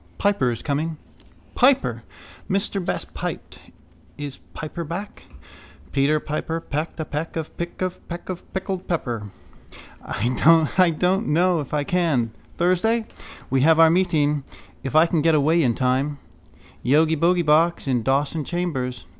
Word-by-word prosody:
Piper 200 -11 +2
is 115 - -5
coming. 155 +2 -2 0.6
—Piper! 135 - +3 0.5
Mr 195 0 -1
Best - - -3
piped. - - -6 0.6
Is 145 -2 -6 0.2
Piper 160 +2 -5
back? 175 +6 -7 0.7
Peter 145 +2 +2
Piper 155 +2 -3
pecked 155 +1 -4
a 160 - -2
peck 150 +3 -4
of 160 -1 -5
pick 170 +2 -4
of 185 -1 -5
peck 170 0 -6
of 180 -2 -7
pickled 190 -1 -4
pepper. 120 - -2 0.7
—I 165 +8 +3
don't 190 +6 +1
know 175 +3 +3
if 145 - -6
I 150 -1 0
can. 145 -9 +1 0.3
Thursday. 200 +6 +2 0.5
We 135 -1 +3
have 160 +3 +5
our 165 -1 +7
meeting. 155 -5 +2 0.4
If 135 +2 -5
I 160 +1 +7
can 165 -2 +1
get 160 +1 +4
away 155 +3 +3
in 120 -6 +2
time. 135 +3 0 0.7
Yogibogeybox 160 +3 +3
in 125 -3 +1
Dawson 140 +5 0
chambers. 135 -7 -3
160 Hz, 140 wpm, -23 LUFS, 140-175 Hz, 0.7 s, our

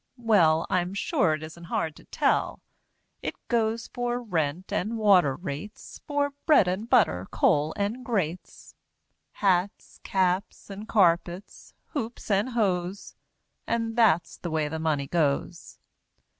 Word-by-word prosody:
Well, 175 -9 +3
I'm 180 +1 -1
sure 170 -5 +1
it 155 - -9
isn't 160 +2 -10
hard 160 -2 -2
to - - -16
tell; - - 0 0.6
It - - -4
goes 230 -1 0
for 245 0 -1
rent, 175 -6 -2
and 220 +5 -1
water 185 -10 +4
rates, 170 +5 -8
For 285 -1 0 0.2
bread 295 - +6
and 195 +6 -2
butter, 95 - +3
coal 150 +1 +2
and 210 +5 -2
grates, 185 -9 -4 0.6
Hats, 190 +1 0
caps, 190 +2 -1
and 205 +2 -8
carpets, 175 -2 0
hoops 235 -6 -5
and 200 +5 +2
hose, 195 -5 -1 0.5
And 230 -1 -1
that's 215 -8 +3
the 175 - -5
way 155 -2 0
the 160 +2 -4
Money 155 -3 0
goes! 145 -2 -1
190 Hz, 130 wpm, -26 LUFS, 165-225 Hz, 0.6 s, bread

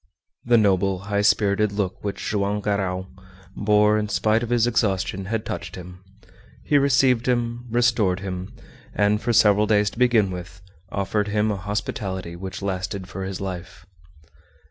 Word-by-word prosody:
The 120 0 +4
noble, 95 -2 +2 0.2
high 100 - +3
spirited 105 0 +2
look 100 -2 -3
which 100 -1 -4
Joam 100 0 0
Garral 95 -2 -2 0.5
bore 105 +1 +3
in 105 -1 -3
spite 110 +1 +2
of 120 - -4
his 120 -1 +3
exhaustion 95 -5 0
had 110 +2 -3
touched 85 -1 -5
him. 90 0 -11 0.6
He 145 - +4
received 135 -3 +3
him, 120 -1 -1
restored 115 -6 +2
him, 95 -1 -5 0.4
and, 105 +1 +2
for 120 - 0
several 105 -2 +4
days 105 -1 +2
to - - -11
begin 115 -6 +3
with, 90 0 -8 0.3
offered 100 +1 -1
him 105 +1 +1
a - - -1
hospitality 95 -3 -4
which 95 +2 -7
lasted 95 0 -3
for 95 +1 -6
his 95 -1 -5
life. 90 -2 -7
100 Hz, 155 wpm, -23 LUFS, 95-110 Hz, 0.6 s, The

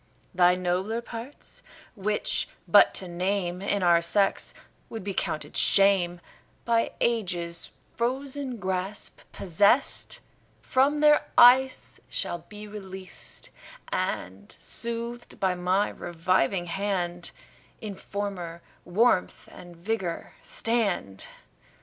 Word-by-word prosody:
Thy 180 0 +5
nobler 185 +5 -1
parts, 235 +3 -9 0.3
which 210 0 -1 0.2
but 190 +4 +7
to 185 - +1
name 180 0 -1
In 200 0 0
our 170 -1 +5
sex 195 +3 +1 0.3
would 225 -4 -6
be 200 0 -3
counted 155 -4 -3
shame, 190 -3 +4 0.4
By 230 -1 +1
ages 175 -7 0 0.2
frozen 260 +2 -2
grasp 190 +1 -3
possest, 200 - +2 0.4
From 280 +3 +2
their 300 0 +5
ice 260 +2 +6
shall 175 - -2
be 210 0 -9
released, 190 -3 -9 0.4
And, 95 +2 -3
soothed 235 +1 -4
by 190 -1 +2
my 180 +3 +1
reviving 175 0 0
hand, 175 -1 -2 0.5
In 215 -3 -6
former 190 -4 -5 0.2
warmth 185 +1 +1
and 175 -1 -12
vigour 180 -1 -3
stand. 200 - -1
195 Hz, 100 wpm, -27 LUFS, 175-230 Hz, 0.5 s, but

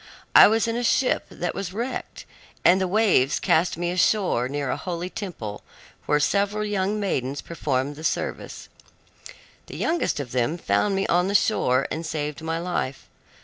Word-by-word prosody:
I - - +10
was 225 +2 +2
in 230 - -1
a 240 - -2
ship 250 +2 +1
that 175 0 -4
was 190 -2 -5
wrecked, 235 +5 -5 0.4
and 185 +2 +6
the 190 - +1
waves 180 - +3
cast 160 +1 +2
me 175 0 -1
ashore 180 - +1
near 140 -1 -2
a - - 0
holy 180 0 -5
temple 120 - -6 0.5
where 150 - +3
several 205 +6 +1
young 205 0 -1
maidens 140 -9 -2
performed 145 -4 -2
the 155 - -10
service. - - -3 1.0
The - - -8
youngest 330 - 0
of 130 -4 -5
them 125 +6 0
found 195 +3 +1
me 195 - 0
on 180 +1 +2
the 200 - -1
shore 135 - +2
and 160 - -3
saved 150 -2 -4
my 165 0 -2
life. 170 -6 -3
175 Hz, 170 wpm, -24 LUFS, 145-200 Hz, 1.0 s, I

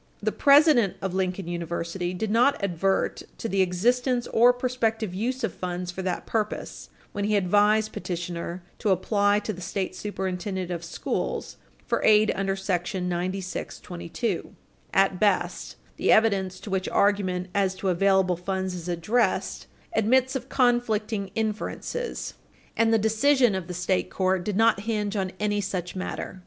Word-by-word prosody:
The - - 0
president 280 - +5
of 190 -1 -3
Lincoln 185 -1 -1
University 170 +1 -3
did 215 +3 -2
not 245 +2 +3
advert 190 +1 0 0.2
to - - -4
the 195 -3 +1
existence 240 +7 +1
or 240 +2 +7
prospective 230 -5 -1
use 245 +7 -2
of 225 - -1
funds 180 0 -4
for 185 - -5
that 185 -1 -3
purpose 215 -2 -3 0.2
when 205 - -3
he 210 0 +2
advised 210 +3 +3
petitioner 175 0 -4 0.2
to 215 - 0
apply 205 +2 +2
to 215 +1 -3
the 180 - -9
State 190 +1 -3
Superintendent 190 -2 -3
of 170 -1 -4
Schools 170 - -3 0.3
for - - 0
aid 215 0 +5
under 195 0 -1
§ 190 -1 -2
9622. 180 +1 -4 0.4
At 195 -1 +2
best, 210 -2 0 0.2
the - - +2
evidence 195 -4 +3
to 205 - -8
which 190 -1 -1
argument 185 -3 +1
as 195 -2 +1
to 190 0 -2
available 190 0 +3
funds 190 +1 -2
is 180 -1 -6
addressed 195 +6 0 0.3
admits 255 +5 +3
of 265 0 -4
conflicting 225 -5 +1
inferences, 225 - -3 0.4
and 225 0 +3
the 225 - +5
decision 230 +3 +3
of 190 -2 -3
the 180 - -5
state 180 +1 0
court 185 -1 0
did 205 0 -2
not 225 -2 +4
hinge 210 -1 -2
on 190 -2 -1
any 205 0 0
such 185 -2 -4
matter. 185 0 -5
195 Hz, 150 wpm, -26 LUFS, 180-220 Hz, 0.4 s, or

